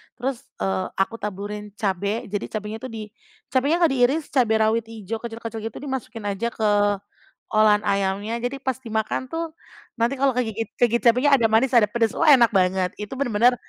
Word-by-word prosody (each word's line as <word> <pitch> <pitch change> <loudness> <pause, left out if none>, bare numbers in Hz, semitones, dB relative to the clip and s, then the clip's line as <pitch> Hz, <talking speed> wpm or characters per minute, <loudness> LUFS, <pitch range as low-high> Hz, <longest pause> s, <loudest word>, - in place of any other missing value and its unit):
terus, 260 +1 -4 0.2
eee, 95 -1 0
aku 225 +4 -1
taburin 205 +1 -6
cabe, 200 +2 -1
jadi 205 - -2
cabenya 210 +1 -4
itu 260 - -3
di 220 -1 -6 0.5
cabenya 275 +5 +2
nggak 325 - +5
diiris 270 +4 +2
cabe 245 -5 +3
rawit 220 +1 +1
ijo, 225 0 -6
kecil-kecil 230 -1 -6
gitu 225 - -9
dimasukin 250 -5 -5
aja 205 +3 -2
ke 215 -1 +1 0.8
olahan 215 -1 +4
ayamnya 200 +3 -1
jadi 275 +3 -2
pas 260 -1 -1
dimakan 220 +1 -2
tuh 325 +3 -4 0.5
nanti 235 +4 +1
kalau 275 0 +3
kegigit 225 -3 -1
kegigit 235 0 +2
cabenya 275 +4 +4
ada 235 -4 +3
manis, 240 +4 +3
ada 235 - +7
pedes, 230 -1 +1
wah 320 -2 +5
enak 245 -4 +7
banget 185 -1 +2
itu 210 -1 -6
bener-bener 245 -1 +3
225 Hz, 175 wpm, -23 LUFS, 210-255 Hz, 0.8 s, ada